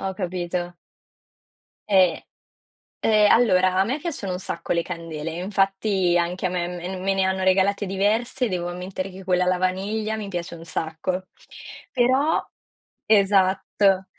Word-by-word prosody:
Ho 190 Hz, 0 st, -2 dB
capito. 175 Hz, -1 st, -4 dB, 1.1 s
E 185 Hz, -4 st, +3 dB, 0.8 s
e 215 Hz, -1 st, +4 dB
allora, 185 Hz, -6 st, +4 dB
a 195 Hz, -, +4 dB
me 255 Hz, +6 st, -1 dB
piacciono 285 Hz, -, -4 dB
un 180 Hz, -, -4 dB
sacco -, -, -3 dB
le 170 Hz, -, +1 dB
candele, 165 Hz, -3 st, -6 dB
infatti 195 Hz, 0 st, +1 dB
anche 175 Hz, +2 st, -1 dB
a -, -, -3 dB
me 175 Hz, -1 st, -2 dB
mem 180 Hz, +1 st, -5 dB
me 195 Hz, +1 st, +1 dB
ne 195 Hz, 0 st, +1 dB
hanno 190 Hz, 0 st, 0 dB
regalate 195 Hz, +2 st, +2 dB
diverse, 215 Hz, +5 st, 0 dB
devo 175 Hz, -1 st, -2 dB
ammettere 185 Hz, +2 st, -5 dB
che 190 Hz, +1 st, -11 dB
quella 180 Hz, -1 st, +2 dB
alla 185 Hz, -, +2 dB
vaniglia 205 Hz, +4 st, -1 dB
mi 210 Hz, -2 st, -5 dB
piace 175 Hz, -2 st, -5 dB
un 165 Hz, 0 st, -11 dB
sacco. 175 Hz, +3 st, -3 dB, 0.7 s
Però 260 Hz, +5 st, +2 dB, 0.6 s
esatto. 195 Hz, -1 st, +3 dB
190 Hz, 145 wpm, -23 LUFS, 180-200 Hz, 1.1 s, e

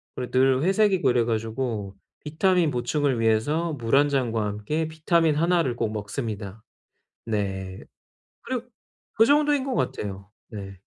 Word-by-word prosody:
그리고 125 Hz, -, -5 dB
늘 130 Hz, +1 st, +3 dB
회색이고 190 Hz, -5 st, +3 dB
이래 120 Hz, -2 st, +2 dB
가지고 110 Hz, -3 st, -3 dB, 0.3 s
비타민 165 Hz, +1 st, +2 dB
보충을 130 Hz, +1 st, 0 dB
위해서 145 Hz, +10 st, +1 dB
물 120 Hz, -3 st, 0 dB
1 145 Hz, +1 st, +5 dB
잔과 120 Hz, -6 st, 0 dB
함께 105 Hz, +11 st, -2 dB
비타민 160 Hz, 0 st, +1 dB
하나를 165 Hz, -5 st, +1 dB
꼭 115 Hz, -2 st, -1 dB
먹습니다. 105 Hz, -1 st, -5 dB, 0.6 s
네. 95 Hz, -4 st, -3 dB, 0.6 s
그리고 250 Hz, -2 st, -4 dB, 0.5 s
그 225 Hz, -, +5 dB
정도인 290 Hz, +1 st, +3 dB
것 270 Hz, -2 st, -2 dB
같아요. 100 Hz, -, -3 dB, 0.2 s
네. 100 Hz, -3 st, -8 dB
130 Hz, 280 characters per minute, -25 LUFS, 110-160 Hz, 0.6 s, 1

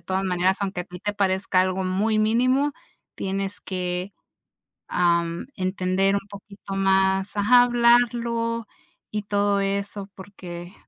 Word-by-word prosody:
todas 190 Hz, +1 st, -2 dB
maneras, 185 Hz, +1 st, +1 dB
aunque 195 Hz, -2 st, -2 dB
a -, -, -15 dB
ti 180 Hz, +1 st, -10 dB
te 205 Hz, +1 st, -2 dB
parezca 190 Hz, -1 st, +1 dB
algo 185 Hz, 0 st, 0 dB
muy 210 Hz, +4 st, +1 dB
mínimo 255 Hz, +6 st, +2 dB, 0.4 s
tienes 195 Hz, +1 st, -3 dB
que, 180 Hz, +1 st, -3 dB, 0.8 s
am, 170 Hz, -1 st, +1 dB
entender 185 Hz, +1 st, 0 dB
un 200 Hz, 0 st, -3 dB
poquito 200 Hz, -1 st, -9 dB
más 190 Hz, 0 st, +2 dB
Ajá, 245 Hz, +5 st, +6 dB
hablarlo, 235 Hz, -1 st, +2 dB, 0.5 s
y 210 Hz, -1 st, -3 dB
todo 205 Hz, 0 st, +1 dB
eso 200 Hz, 0 st, -2 dB
porque 180 Hz, -2 st, -9 dB
195 Hz, 125 wpm, -24 LUFS, 185-210 Hz, 0.8 s, Ajá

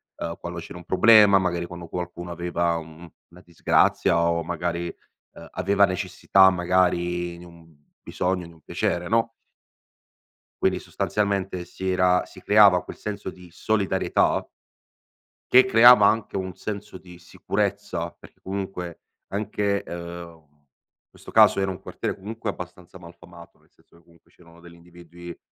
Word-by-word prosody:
uhm, 85 Hz, 0 st, -5 dB
quando 85 Hz, 0 st, -6 dB
c'era 85 Hz, -, -10 dB
un 90 Hz, -, -12 dB
problema, 100 Hz, +1 st, +6 dB
magari 85 Hz, -2 st, -2 dB
quando 85 Hz, -1 st, -9 dB
qualcuno 90 Hz, 0 st, -6 dB
aveva, 85 Hz, 0 st, -1 dB
uhm, 80 Hz, +1 st, -11 dB, 0.2 s
una 90 Hz, +1 st, -17 dB
disgrazia 85 Hz, 0 st, +1 dB
o 85 Hz, 0 st, +1 dB
magari, 85 Hz, 0 st, -3 dB, 0.4 s
uhm, -, -, -12 dB
aveva 100 Hz, +2 st, +1 dB
necessità 95 Hz, 0 st, +3 dB
magari 90 Hz, -1 st, 0 dB
di 85 Hz, -, -13 dB
un 85 Hz, -2 st, -17 dB, 0.3 s
bisogno, 90 Hz, 0 st, -2 dB
di 85 Hz, -, -15 dB
un 80 Hz, -, -22 dB
piacere 90 Hz, +3 st, -2 dB
no 115 Hz, +1 st, +2 dB, 1.3 s
quindi -, -, +2 dB
sostanzialmente 100 Hz, -3 st, -2 dB
si 95 Hz, -, -7 dB
era 90 Hz, -1 st, +2 dB
si -, -, -15 dB
creava 100 Hz, -4 st, +5 dB
quel -, -, -10 dB
senso 105 Hz, -2 st, -6 dB
di 90 Hz, -1 st, -13 dB
solidarietà 95 Hz, 0 st, 0 dB, 1.0 s
che 130 Hz, +1 st, +8 dB
creava 120 Hz, -3 st, +7 dB
anche 110 Hz, 0 st, -1 dB
un 95 Hz, -1 st, -3 dB
senso 105 Hz, -2 st, -7 dB
di 90 Hz, -1 st, -15 dB
sicurezza. 90 Hz, -, -3 dB
Perché -, -, -19 dB
comunque 95 Hz, -3 st, -6 dB, 0.3 s
anche, 100 Hz, 0 st, -2 dB
ehm, 85 Hz, -2 st, -9 dB, 0.6 s
questo -, -, -14 dB
caso -, -, +5 dB
era 95 Hz, 0 st, -1 dB
un 90 Hz, -, -8 dB
quartiere, -, -, -5 dB
comunque, 110 Hz, +3 st, -6 dB
abbastanza 90 Hz, -1 st, -9 dB
malfamato, 85 Hz, 0 st, -15 dB
nel -, -, -30 dB
senso -, -, -26 dB
che 85 Hz, -, -24 dB
comunque 85 Hz, 0 st, -26 dB
c'erano 85 Hz, -1 st, -20 dB
degli 85 Hz, 0 st, -15 dB
individui, 85 Hz, 0 st, -13 dB
90 Hz, 145 wpm, -24 LUFS, 85-95 Hz, 1.3 s, che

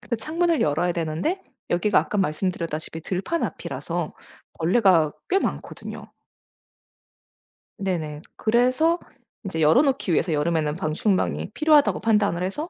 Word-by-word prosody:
근데 235 Hz, -, -3 dB
창문을 330 Hz, +7 st, 0 dB
열어야 165 Hz, +4 st, +1 dB
되는데 170 Hz, -, -2 dB, 0.3 s
여기가 180 Hz, +4 st, +3 dB
아까 210 Hz, -, -1 dB
말씀드렸다시피 165 Hz, -2 st, -2 dB
들판 195 Hz, -, -2 dB
앞이라서 -, -, -4 dB, 0.5 s
벌레가 170 Hz, -3 st, +4 dB, 0.2 s
꽤 385 Hz, -, +3 dB
많거든요. -, -, -5 dB, 1.7 s
네네. 160 Hz, -6 st, -3 dB
그래서 255 Hz, +9 st, +2 dB, 0.5 s
이제 165 Hz, -4 st, -3 dB
열어 155 Hz, -, +6 dB
놓기 270 Hz, -, 0 dB
위해서 165 Hz, +1 st, +1 dB
여름에는 150 Hz, 0 st, 0 dB
방충망이 185 Hz, +3 st, -1 dB
필요하다고 305 Hz, -2 st, +4 dB
판단을 205 Hz, -5 st, +2 dB
해서 295 Hz, -, -3 dB
185 Hz, 325 characters per minute, -24 LUFS, 160-255 Hz, 1.7 s, 열어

